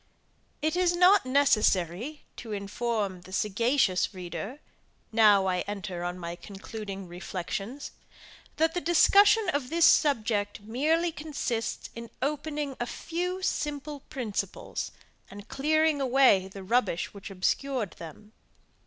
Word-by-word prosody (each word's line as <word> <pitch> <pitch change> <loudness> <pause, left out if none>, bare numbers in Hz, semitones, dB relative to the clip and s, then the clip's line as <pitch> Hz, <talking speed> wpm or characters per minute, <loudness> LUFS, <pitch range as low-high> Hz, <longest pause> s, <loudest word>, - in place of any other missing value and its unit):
It 310 +1 +1
is 355 -1 +2
not 365 -2 +5
necessary 245 - +2
to 225 -3 -7
inform 200 -1 -2
the 185 - -14
sagacious 210 -1 +1
reader, 180 - -6 0.5
now 210 -3 +5
I 185 -1 +1
enter 195 -3 -5
on 175 +1 -3
my 170 -1 -5
concluding 195 0 -8
reflections, 190 +8 -5 0.7
that 325 0 +2
the 355 - -2
discussion 400 +5 +5
of 285 -7 -1
this 335 0 +4
subject 215 -7 +2
merely 310 +11 +1
consists 290 -8 -4
in 230 0 -8
opening 290 0 -2
a 240 - -2
few 360 +6 -4
simple 295 -3 -2
principles, 260 - -4 0.4
and 205 +1 -11
clearing 310 +1 +1
away 255 -8 +4
the 195 0 -10
rubbish 205 -4 0
which 200 +1 -9
obscured 215 +4 -1
them. 190 +7 -11
235 Hz, 120 wpm, -28 LUFS, 195-300 Hz, 0.7 s, not